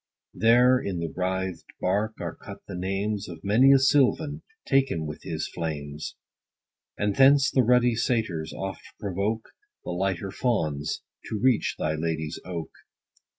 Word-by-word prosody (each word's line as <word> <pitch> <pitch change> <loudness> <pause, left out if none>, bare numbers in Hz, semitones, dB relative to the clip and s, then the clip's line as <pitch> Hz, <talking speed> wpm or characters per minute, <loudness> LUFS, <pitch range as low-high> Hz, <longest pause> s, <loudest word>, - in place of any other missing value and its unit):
There, 125 +3 +5
in 100 -7 -3
the 85 -4 -4
writhed 95 -2 -2
bark, 105 +4 0
are - - -3
cut - - -11
the - - -7
names 95 +3 -2
Of 85 -2 -9
many 115 +7 +5
a 140 - +8
sylvan, 145 +3 +2 0.3
taken 135 - +2
with 75 - -6
his - - -3
flames; 75 -2 -5 0.8
And 105 -1 0
thence 140 +1 +6
the 130 - +4
ruddy 125 0 +4
satyrs 110 -9 -1
oft 95 -2 -5 0.2
provoke 100 +3 -2 0.3
The - - -4
lighter 95 +1 -1
fauns, 80 - -1 0.3
to 110 - -2
reach 125 0 +2
thy 75 0 0
lady's 80 0 -3
oak. 85 -3 -5
100 Hz, 145 wpm, -26 LUFS, 85-125 Hz, 0.8 s, a